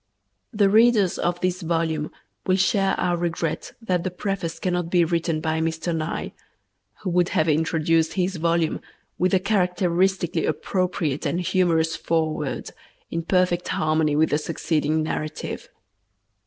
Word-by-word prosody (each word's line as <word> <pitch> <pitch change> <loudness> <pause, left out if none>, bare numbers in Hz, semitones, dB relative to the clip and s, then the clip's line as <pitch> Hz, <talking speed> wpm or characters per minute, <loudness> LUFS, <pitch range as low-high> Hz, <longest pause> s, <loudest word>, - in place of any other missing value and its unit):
The 205 -1 +3
readers 215 -2 +4
of 175 0 0
this 185 +1 0
volume 160 -2 -1 0.4
will 185 - +4
share 195 0 +2
our 175 -1 +1
regret 170 -2 -3
that 180 -5 0
the 185 - -1
preface 180 -2 -3
cannot 180 -1 -1
be 175 -1 +4
written 165 -1 -1
by 160 0 0
Mr. 165 +1 -1
Nye, 160 0 -3 0.7
who 185 - -1
would 175 0 +2
have 155 - +3
introduced 160 +1 +2
his 185 -1 -1
volume 165 0 0 0.4
with 185 +2 +3
a - - +4
characteristically 180 -3 +1
appropriate 160 -3 -1
and 175 - -1
humorous 165 -3 +1
foreword 155 -3 -2 0.4
in 165 - -1
perfect 180 0 +1
harmony 155 -1 +1
with 160 +2 +3
the 150 - +2
succeeding 155 0 0
narrative. 155 0 -4
170 Hz, 140 wpm, -24 LUFS, 160-185 Hz, 0.7 s, readers